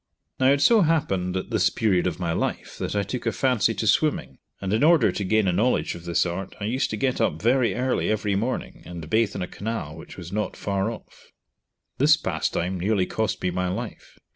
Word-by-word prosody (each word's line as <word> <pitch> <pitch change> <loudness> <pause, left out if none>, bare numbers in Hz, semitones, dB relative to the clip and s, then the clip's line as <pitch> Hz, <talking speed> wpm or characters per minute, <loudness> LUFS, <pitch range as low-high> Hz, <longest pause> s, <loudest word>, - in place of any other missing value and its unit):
Now 130 - +4
it 140 0 +2
so 225 +7 +6
happened 120 - +1
at 95 - -5
this 100 -5 +3
period 95 -5 +1
of 90 - -3
my 85 -2 -1
life - - -3
that - - -3
I 100 - +1
took 120 +5 -4
a - - +3
fancy 115 -3 +1
to - - -2
swimming, 100 - +1 0.2
and 95 0 -2
in 110 - +2
order 165 0 +5
to 100 - -3
gain 110 +1 +2
a 90 - +2
knowledge 110 +8 +1
of 85 0 -10
this 85 +1 +1
art 90 +3 -4
I - - -6
used 125 +6 0
to 110 - -3
get 130 +3 0
up 75 - +1
very 120 +3 +2
early 125 +1 0
every 105 -1 0
morning 115 +6 -3
and 85 -2 -8
bathe 110 +4 +1
in 95 - -2
a - - -4
canal 100 -9 -5
which 80 - -11
was 90 -1 -8
not 105 +1 -2
far 100 +1 -1
off. 115 - -11 0.7
This 150 +3 +6
pastime 90 - -2
nearly 95 0 +1
cost 100 -3 -2
me 90 - +1
my 90 +1 -1
life. 90 - -6
100 Hz, 220 wpm, -24 LUFS, 90-120 Hz, 0.7 s, so